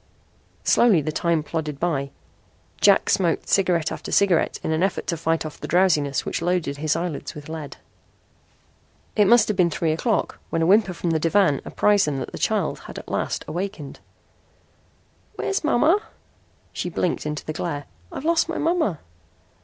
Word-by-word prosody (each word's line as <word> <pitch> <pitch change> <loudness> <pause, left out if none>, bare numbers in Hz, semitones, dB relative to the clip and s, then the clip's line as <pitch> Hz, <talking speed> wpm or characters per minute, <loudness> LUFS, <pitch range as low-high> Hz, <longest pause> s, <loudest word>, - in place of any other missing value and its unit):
Slowly 215 -9 +4
the 155 - -2
time 165 0 0
plodded 150 -3 -4
by. 145 -5 -1 0.7
Jack 200 -1 +5
smoked 175 -4 +1
cigarette 180 -5 +2
after - - -6
cigarette 190 -5 +2
in - - -1
an 160 +1 0
effort 190 0 0
to 170 - -1
fight 165 0 -1
off 155 - -8
the - - -6
drowsiness 155 -6 +2
which - - -3
loaded 170 -4 -1
his 155 +1 0
eyelids 165 -3 -4
with 150 -1 -9
lead. 155 -3 -7 1.4
It 210 -2 +4
must 235 0 +6
have 210 - 0
been 180 -2 +3
three 160 0 -1
o'clock 200 +6 -1
when 165 - 0
a - - +3
whimper 195 0 +3
from 170 0 -2
the 160 - +1
divan 165 -3 +2
apprised 205 -4 +2
them 145 -2 -1
that 130 - -5
the - - -7
child - - 0
at - - -9
last - - -2
had - - -12
awakened. 175 -5 -5 1.4
"Where's 390 -2 -2
mama?" 310 +6 +3 0.7
She 180 - -3
blinked 170 -2 -1
into 150 -1 -4
the 155 - -4
glare. 150 -3 -4 0.3
"I've 280 - -7
lost 330 0 +2
my 330 - -2
mama." 320 - 0
170 Hz, 170 wpm, -23 LUFS, 155-200 Hz, 1.4 s, must